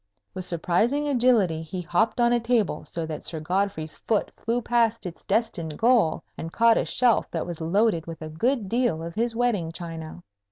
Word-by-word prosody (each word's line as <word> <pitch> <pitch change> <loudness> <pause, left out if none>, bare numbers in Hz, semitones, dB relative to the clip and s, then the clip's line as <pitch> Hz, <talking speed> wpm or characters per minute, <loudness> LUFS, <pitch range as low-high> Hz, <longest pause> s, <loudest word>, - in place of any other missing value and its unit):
With 185 -1 -5
surprising 215 - +1
agility 235 - +3
he 180 +3 -5
hopped 180 +8 +1
on 240 0 +4
a 240 - +3
table, 230 -3 0
so 165 -1 -4
that 155 -1 -5
Sir 160 - -5
Godfrey's 175 -1 -2
foot 220 -2 -1
flew 235 +2 -1
past 230 -2 +1
its 175 -2 -8
destined 175 -8 -1
goal 225 -9 +3 0.2
and 165 - -5
caught 230 +3 +4
a - - -1
shelf 245 -3 +2
that - - -3
was 170 -2 -6
loaded 175 0 +1
with 165 -1 -7
a 155 - -6
good 225 - 0
deal 230 -7 0
of 170 0 -6
his 230 +3 -1
wedding 225 -9 0
china. 165 0 -8
195 Hz, 190 wpm, -25 LUFS, 165-235 Hz, 0.2 s, on